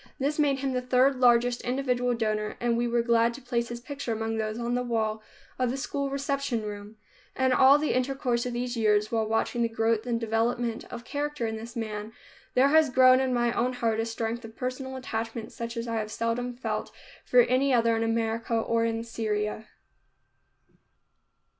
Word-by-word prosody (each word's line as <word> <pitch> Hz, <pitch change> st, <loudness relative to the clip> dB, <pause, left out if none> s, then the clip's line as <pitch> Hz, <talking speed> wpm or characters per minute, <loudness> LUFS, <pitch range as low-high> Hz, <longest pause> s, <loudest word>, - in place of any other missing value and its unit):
This 290 Hz, +3 st, -1 dB
made 280 Hz, -3 st, +2 dB
him 270 Hz, -1 st, -1 dB
the 250 Hz, -, 0 dB
third 255 Hz, +1 st, +3 dB
largest 245 Hz, -1 st, +4 dB
individual 250 Hz, -1 st, 0 dB
donor 215 Hz, -2 st, -2 dB
and 235 Hz, -1 st, +1 dB
we 240 Hz, +1 st, 0 dB
were 235 Hz, 0 st, +1 dB
glad 235 Hz, 0 st, +3 dB
to 275 Hz, -, -10 dB
place 235 Hz, -1 st, -1 dB
his 240 Hz, 0 st, -5 dB
picture 265 Hz, -1 st, -5 dB
among 225 Hz, 0 st, -2 dB
those 215 Hz, 0 st, -2 dB
on 240 Hz, 0 st, -2 dB
the 250 Hz, -, +1 dB
wall 220 Hz, -3 st, -1 dB, 0.4 s
of 255 Hz, -1 st, +2 dB
the 260 Hz, -, -2 dB
school 280 Hz, +1 st, -2 dB
reception 275 Hz, -4 st, -2 dB
room. 205 Hz, 0 st, -7 dB, 0.4 s
In 260 Hz, 0 st, +2 dB
all 265 Hz, +2 st, +7 dB
the 300 Hz, 0 st, 0 dB
intercourse 250 Hz, -2 st, 0 dB
of 245 Hz, -, -4 dB
these 245 Hz, +1 st, -2 dB
years, 210 Hz, -1 st, +2 dB
while 225 Hz, -2 st, 0 dB
watching 225 Hz, +2 st, 0 dB
the 230 Hz, -, +2 dB
growth 225 Hz, 0 st, 0 dB
and 235 Hz, -1 st, 0 dB
development 230 Hz, +1 st, -1 dB
of 240 Hz, 0 st, -9 dB
character 290 Hz, -1 st, -3 dB
in 220 Hz, 0 st, -2 dB
this 225 Hz, +1 st, -8 dB
man, 215 Hz, -1 st, -5 dB, 0.4 s
there 265 Hz, +2 st, +5 dB
has 315 Hz, 0 st, +5 dB
grown 255 Hz, 0 st, +6 dB
in 265 Hz, -1 st, 0 dB
my 240 Hz, -1 st, +1 dB
own 250 Hz, +2 st, 0 dB
heart 230 Hz, -3 st, 0 dB
a 225 Hz, -, 0 dB
strength 230 Hz, +1 st, -3 dB
of 225 Hz, 0 st, -10 dB
personal 260 Hz, +1 st, -4 dB
attachment 225 Hz, -3 st, -4 dB
such 235 Hz, 0 st, -6 dB
as 230 Hz, +1 st, -3 dB
I 230 Hz, -1 st, -2 dB
have 215 Hz, -1 st, -3 dB
seldom 240 Hz, +2 st, -2 dB
felt 250 Hz, -, -3 dB, 0.3 s
for 250 Hz, -, +5 dB
any 255 Hz, +3 st, +2 dB
other 230 Hz, -2 st, +3 dB
in 225 Hz, -, -1 dB
America 225 Hz, 0 st, -1 dB
or 230 Hz, 0 st, +1 dB
in 230 Hz, 0 st, -1 dB
Syria. 215 Hz, -1 st, -3 dB
235 Hz, 195 wpm, -27 LUFS, 225-255 Hz, 0.4 s, all